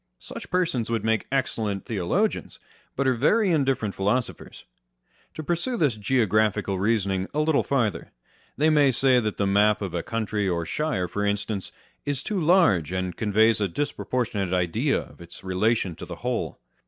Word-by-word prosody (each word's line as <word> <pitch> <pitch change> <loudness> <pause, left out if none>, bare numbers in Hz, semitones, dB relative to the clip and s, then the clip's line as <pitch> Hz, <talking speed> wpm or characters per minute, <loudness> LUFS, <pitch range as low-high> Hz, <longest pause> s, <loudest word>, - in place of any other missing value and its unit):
Such - - -9
persons 165 -11 0
would 115 -2 -1
make 110 0 0
excellent 110 -7 -1
theologians, 95 -6 -1 0.4
but 140 - 0
are 130 - +3
very 190 - +2
indifferent 135 - +1
philosophers. 110 +6 -2 0.7
To 155 - -5
pursue 175 - 0
this 145 - +2
geographical 105 -3 +1
reasoning 100 -2 0
a - - +1
little 155 -1 +3
farther. 120 -8 -1
â€" - - -39 0.5
They 155 +2 +3
may 145 -2 +5
say 130 0 +3
that 110 -3 -2
the 100 - +1
map 105 +2 +3
of 95 -4 -4
a 85 - -1
country 105 -1 -2
or 85 -2 -1
shire, 100 - -1
for 105 +3 -3
instance, 100 -1 -2 0.3
is 145 -2 -3
too 205 -3 -2
large, 150 - +3
and 95 -1 -2
conveys 110 0 +3
a 100 - +2
disproportionate 110 -4 -2
idea 90 -2 +1
of - - -15
its 85 - -12
relation 95 0 0
to - - -7
the - - -6
whole. - - -2
110 Hz, 165 wpm, -25 LUFS, 100-135 Hz, 0.7 s, may